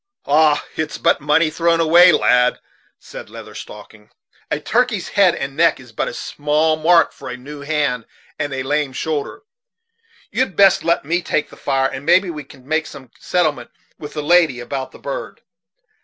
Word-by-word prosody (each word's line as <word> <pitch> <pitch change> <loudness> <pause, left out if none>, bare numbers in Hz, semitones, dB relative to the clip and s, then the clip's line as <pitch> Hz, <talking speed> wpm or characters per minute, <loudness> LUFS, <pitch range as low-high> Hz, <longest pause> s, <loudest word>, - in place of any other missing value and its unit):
"Ah! 150 +1 +3
it's 155 -1 -3
but - - +1
money 155 +2 +2
thrown 165 +1 +1
away, 170 +2 +6
lad," 125 -5 +3 0.4
said - - -11
Leather - - -11
Stocking. 105 0 -12 0.4
"A 150 - -1
turkey's 225 +2 0
head 195 -4 +3
and 135 0 -5
neck 165 -1 +3
is 125 -3 -15
but 110 - -3
a - - -5
small 150 +2 0
mark 165 +2 +3
for - - -10
a 125 - -6
new 145 +3 -10
hand 140 -5 -1 0.3
and 145 -1 -2
a 135 -1 -3
lame 145 0 -1
shoulder. 155 - -4 0.9
You'd 255 -7 -1
best 195 -1 +5
let 170 -3 0
me 170 +4 0
take 155 -3 -2
the - - -13
fire, 135 -1 0
and 135 - -7
maybe 185 +4 +3
we 150 -2 -7
can 135 -1 -18
make 155 +1 0
some 130 -4 -12
settlement 155 -9 -1 0.3
with 150 -1 -9
the 150 - -4
lady 165 -5 +3
about 130 +2 -5
the - - -14
bird." - - -7
150 Hz, 180 wpm, -19 LUFS, 135-170 Hz, 0.9 s, away